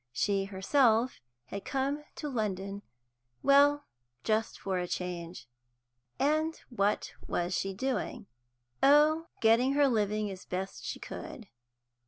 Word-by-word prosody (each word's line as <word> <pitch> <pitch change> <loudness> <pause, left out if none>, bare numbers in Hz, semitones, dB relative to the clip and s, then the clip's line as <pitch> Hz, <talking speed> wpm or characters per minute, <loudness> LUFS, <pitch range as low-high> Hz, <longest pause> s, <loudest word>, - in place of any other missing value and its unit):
She 195 +10 0
herself 225 +5 +2 0.2
had 200 +9 -6
come 280 +2 -1
to 300 - -5
London 200 -5 -3 0.6
well, 285 +1 +5 0.4
just 220 +1 0
for 190 -2 -1
a 180 - -2
change. 175 -5 -5 0.7
And 310 +3 +1
what 205 -3 0
was 175 +1 -1
she 195 +1 -1
doing? 255 -1 -2 0.6
Oh, 305 +3 +5
getting 230 +4 +4
her 285 0 +4
living 215 -3 0
as 185 -1 -9
best 190 +1 -5
she - - -4
could. 230 -9 -8
220 Hz, 120 wpm, -30 LUFS, 195-275 Hz, 0.7 s, well